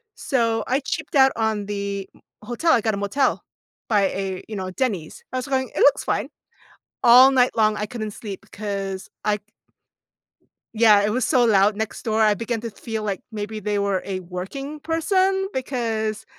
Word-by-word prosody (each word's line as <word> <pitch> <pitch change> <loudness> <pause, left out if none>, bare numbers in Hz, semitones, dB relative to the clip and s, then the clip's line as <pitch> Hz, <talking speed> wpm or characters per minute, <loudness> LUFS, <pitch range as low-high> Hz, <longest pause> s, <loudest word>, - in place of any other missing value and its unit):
So 230 -5 0
I 260 +2 +2
cheaped 265 - -4
out 265 -1 +6
on 220 -2 -1
the 200 -1 -4 0.3
hotel. 245 +9 +1
I 235 - +3
got 220 0 0
a - - -2
motel 200 +8 0 0.5
by 210 -3 +3
a, 190 -1 -4
you 220 - -6
know, 185 -1 -4
Denny's. 190 -8 -3
I - - -1
was 255 - -3
going, 260 -1 0
"It - - -2
looks 285 - +5
fine." - - -1 0.7
All 250 +3 +8
night 250 -1 +3
long, 215 -1 +3
I 210 - -2
couldn't 215 -2 -5
sleep 200 -2 -7
because 195 -1 -5 0.2
I 210 0 +2
c - - -38 1.3
Yeah, 215 -2 +6
it 210 - +1
was 245 +2 0
so 250 -2 +3
loud 205 -2 +4
next 220 0 -4
door. 220 -1 +1
I 215 -1 +5
began 230 +2 -3
to 230 - -4
feel 220 +1 -5
like 200 -3 -2
maybe 215 0 -5
they 210 0 -1
were 200 -2 0
a 190 -1 -3
working 195 - -6
person 380 +5 +1
because 225 -5 -2
220 Hz, 185 wpm, -23 LUFS, 200-255 Hz, 1.3 s, All